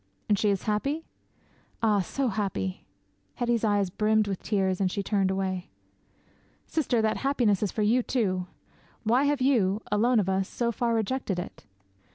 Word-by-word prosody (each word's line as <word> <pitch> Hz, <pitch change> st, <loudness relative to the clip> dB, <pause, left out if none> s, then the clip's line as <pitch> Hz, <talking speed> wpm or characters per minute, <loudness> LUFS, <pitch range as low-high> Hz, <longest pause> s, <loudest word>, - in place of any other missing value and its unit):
'"And 205 Hz, -2 st, +2 dB
she 210 Hz, -, +2 dB
is 195 Hz, -2 st, 0 dB
happy?" 275 Hz, +10 st, -1 dB, 0.8 s
'"Ah, 210 Hz, -2 st, +4 dB
so 255 Hz, +8 st, -1 dB
happy!" 190 Hz, -, -3 dB, 0.5 s
Hetty's 240 Hz, -2 st, 0 dB
eyes 205 Hz, -3 st, +2 dB
brimmed 215 Hz, +1 st, +2 dB
with 195 Hz, -2 st, -3 dB
tears 190 Hz, -3 st, 0 dB
and 185 Hz, -2 st, +1 dB
she 200 Hz, -, -2 dB
turned 195 Hz, -1 st, +1 dB
away. 190 Hz, -1 st, -2 dB, 1.0 s
'"Sister, 245 Hz, -7 st, 0 dB
that 220 Hz, 0 st, +1 dB
happiness 245 Hz, -8 st, +1 dB
is 210 Hz, -, 0 dB
for 215 Hz, -, -1 dB
you, 235 Hz, +5 st, +3 dB
too. 190 Hz, -8 st, -1 dB, 0.6 s
Why 240 Hz, +5 st, +3 dB
have 285 Hz, -2 st, +1 dB
you, 220 Hz, -6 st, +2 dB
alone 230 Hz, +3 st, +3 dB
of 195 Hz, -, 0 dB
us, 190 Hz, 0 st, 0 dB
so 235 Hz, -1 st, -1 dB
far 235 Hz, 0 st, 0 dB
rejected 225 Hz, -3 st, -1 dB
it?" 175 Hz, -, -7 dB
210 Hz, 165 wpm, -27 LUFS, 195-240 Hz, 1.0 s, Ah